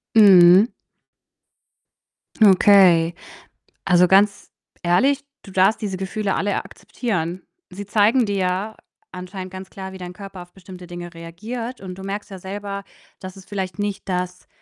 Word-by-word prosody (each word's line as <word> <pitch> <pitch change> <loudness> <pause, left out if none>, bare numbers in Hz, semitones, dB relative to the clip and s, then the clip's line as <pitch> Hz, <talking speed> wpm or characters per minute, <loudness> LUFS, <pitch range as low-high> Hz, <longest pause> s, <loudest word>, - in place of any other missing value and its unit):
Mhm. 195 0 +7 1.7
Okay. 185 -5 +5 0.7
Also, 180 -1 +4
ganz 200 +2 +2 0.3
ehrlich, 260 +12 +2 0.2
du 195 - -13
darfst 190 +3 +2
diese 200 -3 -3
Gefühle 195 +1 -3
alle 205 0 -1
akzeptieren. 180 -7 -4 0.3
Sie 200 +2 -8
zeigen 220 +4 +3
dir 200 -1 -2
ja, 190 +3 -2 0.4
anscheinend 185 +1 -8
ganz 190 0 -9
klar, 190 -1 -8
wie 190 - -10
dein 180 -1 -8
Körper 195 -2 -10
auf 175 - -17
bestimmte 180 -1 -12
Dinge 175 0 -8
reagiert 220 +9 -7
und 185 -2 -8
du - - -8
merkst 200 +2 -6
ja 190 - -8
selber, 200 +1 -6 0.3
das 185 -1 -10
ist 190 - -15
vielleicht 190 -2 -5
nicht 205 -1 -4
das, 180 0 -4
190 Hz, 145 wpm, -21 LUFS, 180-205 Hz, 1.7 s, Mhm